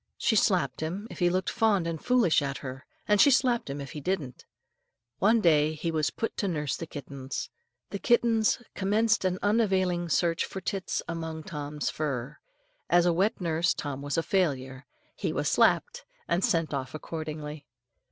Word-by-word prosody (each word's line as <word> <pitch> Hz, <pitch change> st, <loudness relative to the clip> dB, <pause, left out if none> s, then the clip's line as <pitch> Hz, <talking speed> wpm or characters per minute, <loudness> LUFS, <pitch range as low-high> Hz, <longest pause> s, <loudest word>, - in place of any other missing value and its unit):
She 220 Hz, -, +1 dB
slapped 175 Hz, -, +2 dB
him 185 Hz, +7 st, -4 dB
if -, -, -9 dB
he 175 Hz, -1 st, +4 dB
looked 185 Hz, +1 st, 0 dB
fond 220 Hz, -6 st, +2 dB
and 165 Hz, -2 st, -4 dB
foolish 240 Hz, -12 st, +3 dB
at 140 Hz, -1 st, -3 dB
her, 130 Hz, 0 st, -7 dB, 0.2 s
and 210 Hz, -1 st, +5 dB
she -, -, +7 dB
slapped 250 Hz, -, +2 dB
him 140 Hz, +1 st, -4 dB
if 140 Hz, -1 st, -7 dB
he 150 Hz, -, -7 dB
didn't. 150 Hz, -7 st, -3 dB, 0.7 s
One 220 Hz, +3 st, +4 dB
day 155 Hz, -3 st, +3 dB
he 165 Hz, +2 st, -2 dB
was 155 Hz, -2 st, +1 dB
put 225 Hz, -, -4 dB
to 205 Hz, -, 0 dB
nurse 150 Hz, -7 st, -1 dB
the 165 Hz, -, -6 dB
kittens. 140 Hz, -2 st, -6 dB, 0.4 s
The 200 Hz, -, -4 dB
kittens 235 Hz, 0 st, +2 dB
commenced 210 Hz, +2 st, +1 dB
an 185 Hz, 0 st, +1 dB
unavailing 190 Hz, -5 st, +1 dB
search 165 Hz, +1 st, +2 dB
for 190 Hz, -, -6 dB
tits 190 Hz, 0 st, -3 dB
among 160 Hz, -1 st, -5 dB
Tom's 150 Hz, -1 st, -4 dB
fur. 135 Hz, -4 st, -3 dB, 0.5 s
As 175 Hz, 0 st, +5 dB
a 175 Hz, -, +3 dB
wet 195 Hz, +7 st, +1 dB
nurse, 170 Hz, -1 st, +1 dB
Tom 140 Hz, -2 st, -4 dB
was 145 Hz, +2 st, -2 dB
a 165 Hz, -, +2 dB
failure. 135 Hz, -8 st, -1 dB, 0.3 s
He -, -, -2 dB
was -, -, -1 dB
slapped, 485 Hz, 0 st, +2 dB, 0.2 s
and 175 Hz, +3 st, +1 dB
sent 165 Hz, -3 st, +1 dB
off 130 Hz, 0 st, -4 dB
accordingly. 155 Hz, -2 st, -6 dB
165 Hz, 175 wpm, -28 LUFS, 150-200 Hz, 0.7 s, she